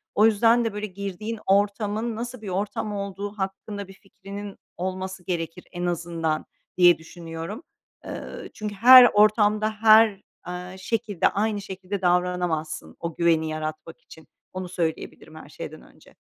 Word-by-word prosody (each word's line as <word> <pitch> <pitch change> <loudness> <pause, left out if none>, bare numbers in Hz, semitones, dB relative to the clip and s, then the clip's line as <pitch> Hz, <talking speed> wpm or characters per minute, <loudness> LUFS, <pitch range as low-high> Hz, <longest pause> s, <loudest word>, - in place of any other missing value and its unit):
O 210 - +5
yüzden 230 +2 +4
de, 225 - -2
böyle, 210 0 -3
girdiğin 200 +3 -5
ortamın 205 +3 +1
nasıl 240 +1 -6
bir 210 - -6
ortam 205 +2 -2
olduğu 200 0 -4
hakkında 195 +1 -5
bir 195 - -12
fikrinin 195 +1 -10 0.2
olması 185 0 -4
gerekir 170 0 -4
en 175 -1 -4
azından 165 -2 -2 0.3
diye 175 -1 +7
düşünüyorum. 165 - -8 0.4
Eee, - - -7
çünkü 210 -1 -5
her 250 +4 +10
ortamda 210 0 +4
her, 215 -1 +5 0.3
eee, 180 +1 -6
şekilde 210 -2 0
aynı 210 0 -1
şekilde 190 0 -6
davranamazsın 180 -3 -1
o 165 -1 -5
güveni 165 -2 +2
yaratmak 155 - -6
için, - - -16 0.3
onu 185 -1 -5
söyleyebilirim 165 -3 -4
her - - -11
şeyden - - -8
önce. - - -20
195 Hz, 140 wpm, -25 LUFS, 175-210 Hz, 0.4 s, her